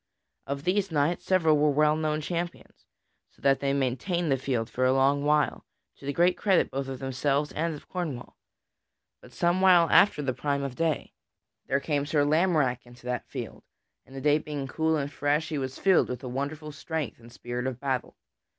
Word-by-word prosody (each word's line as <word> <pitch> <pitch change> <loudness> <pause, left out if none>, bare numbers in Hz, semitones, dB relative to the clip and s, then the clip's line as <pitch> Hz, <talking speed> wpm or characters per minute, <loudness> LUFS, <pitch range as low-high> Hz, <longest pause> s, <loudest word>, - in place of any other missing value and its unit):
Of 140 0 -4
these 195 +3 +1
knights, 155 +3 +1
several 160 -5 +3
were 150 0 +4
well 150 +1 +3
known 155 -1 -1
champions, 175 +2 -5 0.4
so - - -29
that 135 -1 +4
they 140 -1 0
maintained 140 +6 -1
the - - +4
field 125 -4 -2
for 130 - -2
a 130 0 +4
long 135 +2 +2
while, 150 0 +1 0.3
to 135 - -11
the - - +1
great 175 +5 +3
credit 195 -3 +2
both 135 0 -3
of 135 -1 -5
themselves 140 +3 -1
and 165 0 -2
of 145 - -13
Cornwall. 155 -9 -5 0.9
But - - -15
some 175 +2 +1
while 180 -3 +6
after 195 -7 +5
the 130 -2 -1
prime 140 +1 -2
of 135 -2 -4
day, 165 0 -1 0.5
there 140 - +1
came 145 -1 -1
Sir 145 -2 +2
Lamorack 150 -5 +2
into 120 0 -16
that 125 0 -3
field, - - -7 0.4
and, 135 - -16
the 135 - -6
day 150 +1 +3
being 145 -2 -5
cool 160 +3 0
and 140 -1 -3
fresh, 145 +2 0
he 155 -3 -2
was 130 0 -4
filled 190 -3 +3
with 125 0 -5
a - - -5
wonderful 145 +4 -4
strength 150 -2 -4
and 120 0 -15
spirit 120 +2 -4
of 130 -2 -4
battle. 130 -3 -2
145 Hz, 195 wpm, -27 LUFS, 135-160 Hz, 0.9 s, while